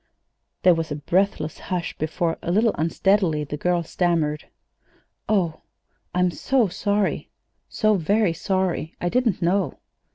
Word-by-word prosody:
There 180 - +7
was 165 -1 -2
a - - -1
breathless 165 +1 0
hush 180 -2 -3
before, 165 +2 -1
a 170 - -2
little 220 +4 +3
unsteadily, 165 -1 +1
the 150 0 -5
girl 175 +3 0
stammered: 165 -3 0 0.8
"Oh, 180 -7 +1 0.5
I'm 180 0 +3
so 250 +1 +1
sorry 205 +2 -1 0.4
so 215 -2 +2
very 200 +2 +2
sorry! 185 -2 -1
I - - -4
I - - +2
didn't 230 -4 +1
know." 175 -3 +1
180 Hz, 135 wpm, -23 LUFS, 165-200 Hz, 0.8 s, There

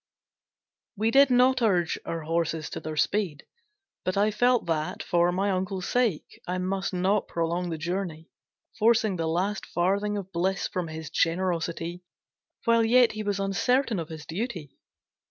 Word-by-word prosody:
We 220 +2 +1
did 275 +1 +6
not 255 +1 +4
urge 180 -7 +2
our 165 -1 -3
horses 165 0 -2
to - - -4
their 155 0 -6
speed, 190 -5 0 0.6
but 185 +1 -1
I 210 +2 +3
felt 245 +3 +2
that, 165 +2 -2
for 175 0 +2
my 195 +3 0
uncle's 185 0 -2
sake, 235 -10 -1
I 180 +1 -1
must 190 +1 -2
not 190 +3 +1
prolong 170 +1 -1
the 165 - -3
journey, 170 -1 -4 0.5
forcing 220 -3 +3
the 165 -1 -1
last 190 +5 -1
farthing 200 +4 0
of 195 -1 -6
bliss 190 +3 0
from 180 -2 -3
his 160 -1 -7
generosity, 170 0 -1 0.6
while 230 -1 +4
yet 240 0 +5
he 215 - -5
was 205 -1 -1
uncertain 225 +3 +1
of 165 -1 -5
his 155 -2 -8
duty. 175 - -5
185 Hz, 155 wpm, -27 LUFS, 165-210 Hz, 0.6 s, did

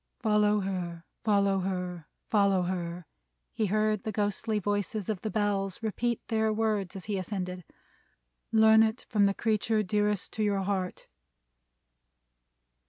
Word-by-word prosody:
"Follow 210 -1 +3
her! 175 -3 -4 0.2
Follow 200 -2 +3
her! 180 -3 -3 0.2
Follow 200 -3 +3
her!" 175 -1 -3 0.5
He 215 - 0
heard 215 +1 +1
the 220 - -3
ghostly 210 +1 -1
voices 205 0 -2
in 210 - -2
the 215 - -2
Bells 200 -1 -1
repeat 235 +2 -2
their 220 -1 +1
words 215 -3 -1
as 190 - -7
he 205 -2 -1
ascended. 185 -1 -4 0.9
"Learn 220 0 +6
it, 220 +2 +1
from 205 -2 +4
the 200 - 0
creature 215 0 +1
dearest 210 0 0
to 215 - -1
your 200 -2 +1
heart!" 190 -2 -2
205 Hz, 135 wpm, -29 LUFS, 190-215 Hz, 0.9 s, Learn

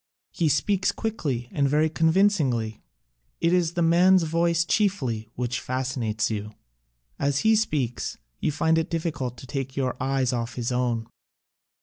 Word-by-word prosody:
He 165 -4 +1
speaks 190 +6 +1
quickly 150 - -3
and 140 -1 +1
very 150 +2 +3
convinc 170 +5 +3
ingly. 115 -5 -1 0.6
It 170 +1 +2
is 175 -2 +2
the 175 -1 +1
man's 180 +2 +5
voice 170 +1 +1
chiefly 140 - 0
which 125 0 -2
fascinates 125 -4 -2
you. 105 0 -5 0.6
As 140 0 +1
he 220 0 +4
speaks 145 - -1 0.2
you - - 0
find 160 +2 +2
it 160 - -2
difficult 150 -7 -3
to - - -10
take 135 +1 -5
your 130 -2 0
eyes 130 -1 +1
off 115 -1 -3
his 120 0 -2
own. 120 -2 0
140 Hz, 150 wpm, -25 LUFS, 125-170 Hz, 0.6 s, man's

